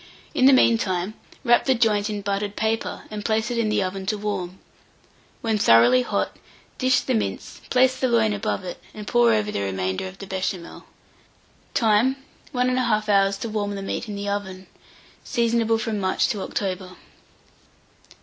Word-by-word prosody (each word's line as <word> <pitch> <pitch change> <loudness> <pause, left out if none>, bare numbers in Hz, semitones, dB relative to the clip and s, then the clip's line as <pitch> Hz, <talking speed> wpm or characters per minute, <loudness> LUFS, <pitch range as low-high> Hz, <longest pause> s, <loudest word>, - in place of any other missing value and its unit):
In 260 - +4
the - - +8
mean 235 -3 +5
time, 185 0 -2 0.3
wrap 240 0 +4
the 265 - +3
joint 215 -3 +2
in 210 -1 -3
buttered 200 +1 -2
paper, 220 +1 -2
and 210 -1 -5
place 220 +1 0
it 235 - -1
in 220 -2 +1
the 210 - +1
oven 190 +1 -4
to 210 0 0
warm. 195 -3 -4 0.8
When 220 -2 0
thoroughly 120 - +6
hot, 245 - -2 0.4
dish 255 -1 +3
the 260 - -1
mince, 220 - -3
place 255 0 +4
the 260 - +2
loin 225 -3 +2
above 200 -1 -2
it, 180 - -7
and 210 -1 -7
pour 240 -1 +4
over 210 -1 +1
the - - -2
remainder 95 - -2
of 185 +1 -11
the 195 - -8
Béchamel. 190 -2 -4 0.9
Time. 230 +3 +3 0.4
1 250 -2 +1
1/2 235 -4 +1
hour 195 -1 +4
to 200 +3 -4
warm 205 -1 -2
the 195 - -5
meat 215 +3 -4
in 205 - -4
the 200 0 -5
oven. 190 -2 -4 0.6
Seasonable 230 -2 +1
from 225 -2 -2
March 190 -1 +1
to 205 - -2
October. 185 -2 -4
210 Hz, 175 wpm, -23 LUFS, 195-230 Hz, 0.9 s, the